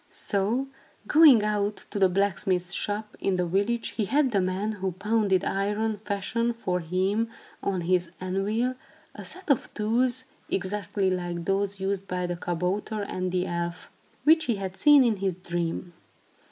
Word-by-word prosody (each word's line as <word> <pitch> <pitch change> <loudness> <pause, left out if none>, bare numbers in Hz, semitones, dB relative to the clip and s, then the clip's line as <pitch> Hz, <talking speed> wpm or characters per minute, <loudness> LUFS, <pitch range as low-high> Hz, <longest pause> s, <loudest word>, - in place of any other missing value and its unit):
So, 220 +7 -1 0.4
going 295 -8 +7
out 210 0 -1
to 205 - -2
the 190 -1 +5
blacksmith's 185 -1 0
shop, 210 +2 -3
in 195 - +1
the 180 -1 +1
village, 205 +7 0
he 215 - -2
had 275 +4 +2
the 200 -3 +2
man 185 +4 -1
who 190 -3 -3
pounded 200 -1 +1
iron 210 +2 0
fashion 220 +3 -1
for 185 -6 -2
him 190 +7 0 0.3
on 190 -3 -1
his 175 0 +1
anvil, 205 +7 0 0.4
a - - -9
set 370 -5 -2
of 270 - +1
tools, 245 +4 +1 0.2
exactly 195 0 0
like 175 -2 -3
those 195 +1 0
used 195 0 -2
by 180 0 -2
the 175 0 -2
kabouter 180 +5 -2
and 185 -2 -3
the 180 0 0
elf, 170 0 -4 0.3
which 320 +2 +5
he 235 - +1
had 190 -2 -5
seen 290 +4 +7
in 230 -4 +2
his 190 -2 -1
dream. 175 -1 -3
195 Hz, 160 wpm, -27 LUFS, 185-220 Hz, 0.4 s, going